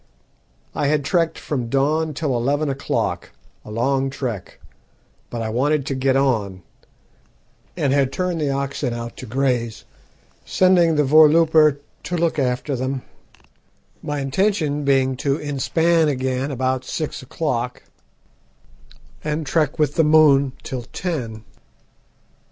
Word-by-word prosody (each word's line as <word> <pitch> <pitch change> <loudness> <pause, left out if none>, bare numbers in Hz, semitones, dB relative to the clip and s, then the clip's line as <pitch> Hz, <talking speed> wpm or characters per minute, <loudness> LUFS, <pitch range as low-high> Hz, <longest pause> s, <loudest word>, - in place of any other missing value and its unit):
"I 145 - 0
had 145 -1 +1
trekked 165 +1 +1
from 125 -6 -3
dawn 150 +4 +1
till 145 -4 -1
eleven 140 +5 0
o'clock 135 +1 -2 0.3
a - - -12
long 135 +5 0
trek 125 -7 -5 0.7
but 115 -1 -4
I 110 - -3
wanted 140 +5 +1
to 140 - -2
get 130 0 +1
on, 110 -9 0 1.1
and 135 - +1
had 140 -2 +2
turned 180 +1 -2
the 145 - 0
oxen 140 -2 -2
out 115 0 -6
to - - -8
graze, 120 -4 -1 0.6
sending 180 -3 +3
the 150 - +3
voorlooper 155 0 +5 0.2
to 175 - -2
look 165 -2 0
after 130 +2 -1
them, 130 +1 -3 1.0
my 145 -1 -3
intention 150 0 0
being 135 -1 +2
to 140 +1 0
inspan 160 +3 +1
again 130 -1 -1
about 130 -1 -1
six 155 +3 -4
o'clock, 125 -3 -3 1.4
and 150 +1 -2
trek 150 -1 0
with 150 -2 0
the 165 - +5
moon 150 -3 +5
till 130 -2 -4
ten. 120 -12 -4
140 Hz, 130 wpm, -21 LUFS, 130-155 Hz, 1.4 s, voorlooper